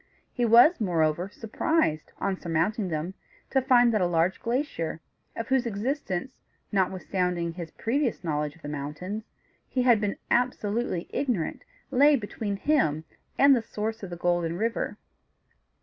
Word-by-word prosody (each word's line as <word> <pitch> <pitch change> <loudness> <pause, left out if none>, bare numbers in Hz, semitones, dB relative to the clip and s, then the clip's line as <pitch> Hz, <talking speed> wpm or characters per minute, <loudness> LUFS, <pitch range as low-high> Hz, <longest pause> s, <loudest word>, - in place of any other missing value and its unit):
He 245 - +1
was, 240 +7 +6
moreover, 170 -1 +1
surprised, 225 - -1
on 195 -1 -1
surmounting 175 +5 0
them, 165 +2 -3 0.4
to 265 - +3
find 245 -2 +5
that 215 - +2
a 180 - +3
large 175 +2 +1
glacier, 235 - -2 0.4
of 230 +1 -5
whose 260 -2 +2
existence, 225 - -3 0.3
notwithstanding 180 -3 0
his 170 -2 -7
previous 245 - -1
knowledge 150 -2 -2
of 165 - -22
the - - -5
mountains, 150 +9 -5 0.4
he 255 - 0
had 240 -4 +5
been 205 -1 -1
absolutely 235 -6 0
ignorant, 245 - -1 0.3
lay 285 +3 +6
between 205 -3 -3
him 195 - +1 0.3
and 280 0 +7
the 240 - +1
source 220 0 -4
of 195 - -6
the 175 - -6
Golden 175 -1 0
River. 230 +3 -1
205 Hz, 145 wpm, -27 LUFS, 170-240 Hz, 0.4 s, and